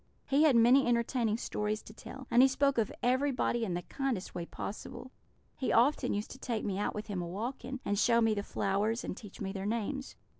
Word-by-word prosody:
He 280 +2 +2
had 290 -5 +5
many 245 +4 +6
entertaining 235 -2 +1
stories 210 -2 -2
to 215 - -12
tell; 265 +4 -10
and 240 - +6
he 265 - +8
spoke 275 -1 +2
of 220 - 0
everybody 255 -2 +1
in 185 -6 -1
the 175 - -3
kindest 265 -7 -3
way 170 -1 -5
possible. 250 +5 -7 0.5
He 260 - -1
often 255 +6 +3
used 205 +1 -4
to 260 - -10
take 235 -5 -3
me 195 -1 -2
out 205 - -1
with 210 0 -4
him 195 -4 -3
a 175 - -4
walking, 245 +7 -5
and 205 0 0
show 235 +1 +4
me 225 -1 +3
the 205 - -1
flowers, 205 +3 -1
and - - -4
teach 210 -2 -11
me 195 -1 -3
their 195 0 -4
names. 235 +5 -3
230 Hz, 220 wpm, -32 LUFS, 205-260 Hz, 0.5 s, he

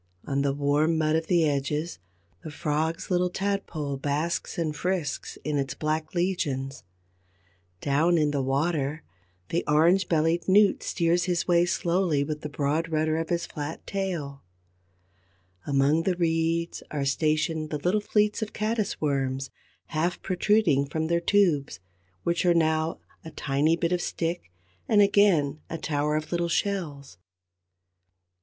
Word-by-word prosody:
On 140 0 0
the 140 0 +1
warm 145 +3 +1
mud 155 0 +2
of 160 0 -1
the 170 -3 +3
edges, 150 - -2 0.4
the - - -6
Frog's 155 +3 -2
little 180 0 +2
Tadpole 180 -7 -2
basks 150 +5 -2
and 155 -3 -1
frisks 175 -4 -2
in 150 0 -1
its 135 -1 -3
black 155 +2 -2
legions; 145 -7 -1 1.0
down 160 +5 +2
in 150 -2 +2
the 140 -1 0
water, 145 +2 -1 0.5
the 170 - 0
orange 170 +5 +4
bellied 165 +1 +1
Newt 200 +1 +4
steers 170 0 +1
his 175 -2 -1
way 175 0 +4
slowly 170 -4 +1
with 150 +1 -4
the 150 - -5
broad 150 +3 -1
rudder 155 0 +1
of 165 0 -3
his 170 0 0
flat 150 +1 -6
tail; 170 -8 -3 1.3
among 140 +3 +3
the 180 +2 0
reeds 165 0 0
are 145 -2 -2
stationed 155 +2 0
the 150 - -2
little 180 +8 +1
fleets 210 +1 +1
of 220 - -1
the - - -19
Caddis 215 -1 -1
worms, 135 -2 -1 0.4
half 170 +2 -1
protruding 185 -7 +2
from 160 +2 -2
their 170 0 +2
tubes, 175 -7 +2 0.4
which 170 0 0
are 175 -1 +4
now 160 0 +1 0.3
a 160 - -8
tiny 150 +1 +1
bit 170 0 -1
of 180 -1 +1
stick 165 - -3 0.4
and 215 - +5
again 195 -8 +4
a 165 - -3
tower 150 -1 -1
of 155 +1 -3
little 170 -1 0
shells. 155 - -2
160 Hz, 150 wpm, -26 LUFS, 145-175 Hz, 1.3 s, and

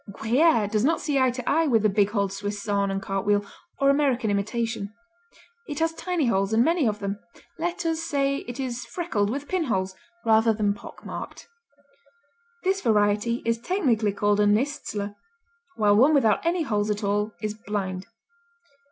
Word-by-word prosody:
Gruyère 230 +1 +2
does 215 0 +1
not 320 +5 +2
see 285 -3 0
eye 260 -1 +4
to 250 0 -6
eye 325 0 +3
with 225 -6 +3
the - - +5
big 205 0 +2
holed 200 -2 -1
Swiss 205 +1 -4
Saanen 200 -2 0
cartwheel 200 +1 0 0.3
or 275 -1 +5
American 265 -6 +1
imitation. 215 +1 -2 0.8
It 295 -3 -5
has 325 +1 +1
tiny 350 -3 -1
holes, 195 -2 +1
and 230 +2 +4
many 330 -5 +2
of 210 -1 0
them; 200 0 -4 0.4
let 345 +1 -2
us 325 0 0
say 275 -4 0
it 245 -1 -7
is 245 -3 -3
freckled 225 - -2
with 280 +5 -4
pinholes, 220 - -1 0.3
rather 225 0 +4
than 205 -1 +1
pock 205 - -12
marked. - - -7 1.2
This 385 +1 +1
variety 210 +1 +1
is 230 0 +1
technically 235 - +1
called 205 +1 +1
a 205 - +4
niszler, 210 -3 -1 0.6
while 205 -1 +3
one 275 +8 +5
without 225 -7 +3
any 335 0 +1
holes 210 -6 -1
at 210 +1 -2
all 205 +1 0
is 215 0 -3
"blind." 200 -3 -4
220 Hz, 170 wpm, -25 LUFS, 205-280 Hz, 1.2 s, the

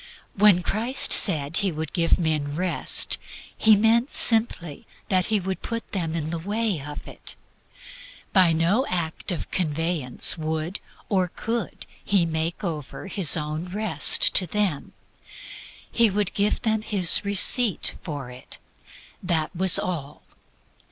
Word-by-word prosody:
When 200 -3 +4
Christ 235 +8 0
said 155 -4 +3
He 195 -2 +1
would 160 -1 -6
give 170 -2 +1
men 155 -3 -2
Rest, 180 +1 -2 0.4
He 220 -1 +4
meant 225 +5 +2
simply 220 -10 +1 0.2
that 185 -3 +1
He 215 -1 +1
would 190 0 -5
put 230 0 -6
them 170 -5 -3
in 160 -1 -4
the 170 - -4
way 205 -1 -2
of 145 +1 -9
it. - - -11 1.0
By 185 -4 +4
no 170 - +1
act 170 +1 -3
of 175 - -6
conveyance 160 -3 +1
would 160 +3 -4 0.3
or 185 -3 0
could 230 +5 -5 0.2
He 195 -4 +1
make 165 +2 -4
over 155 -4 -6
His 190 -5 +4
own 155 +2 -4
Rest 205 +3 +3
to 185 - +2
them. 195 -5 -3 1.0
He 230 -1 +3
could 205 -1 -2
give 205 +3 -1
them 220 -2 0
HIS 195 -5 +4
RECEIPT 205 +2 +1
for 145 -7 -7
it. 125 +1 -12 0.6
That 170 -1 -2
was 185 +1 +4
all. 150 -6 -5
180 Hz, 140 wpm, -23 LUFS, 160-205 Hz, 1.0 s, When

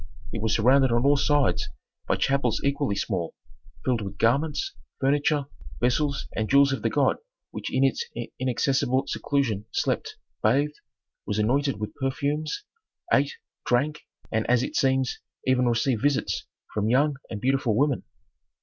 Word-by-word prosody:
It 110 - -3
was 110 0 +1
surrounded 130 +3 +4
on 120 +2 +2
all 145 +1 +6
sides 145 -2 +2 0.4
by - - +2
chapels 135 -4 +1
equally 140 -5 0
small, 95 -5 -2 0.5
filled 125 -3 +1
with 100 0 -6
garments, 150 - +1 0.3
furniture, 145 +1 +2 0.3
vessels 140 +3 +1
and 110 -1 -1
jewels 140 0 +5
of - - -3
the - - +1
god - - +2 0.3
which - - -5
in 130 - +2
its 135 -3 +2 0.4
inaccessible 130 +1 +1
seclusion 120 -8 -1
slept, - - -1 0.3
bathed, 140 +7 +2 0.5
was 105 - -1
anointed 130 +3 +1
with 105 - -4
perfumes, 145 - -2 0.5
ate, 140 +1 +3 0.3
drank, 145 +5 +1 0.3
and 110 0 0
as 125 0 +4
it - - -4
seems 130 -1 +1 0.3
even 125 -1 +3
received 120 0 +1
visits 145 0 0 0.3
from 105 0 0
young 140 +3 +3
and 105 - -5
beautiful 130 -2 +1
women. 140 -1 +2
135 Hz, 145 wpm, -26 LUFS, 115-140 Hz, 0.5 s, all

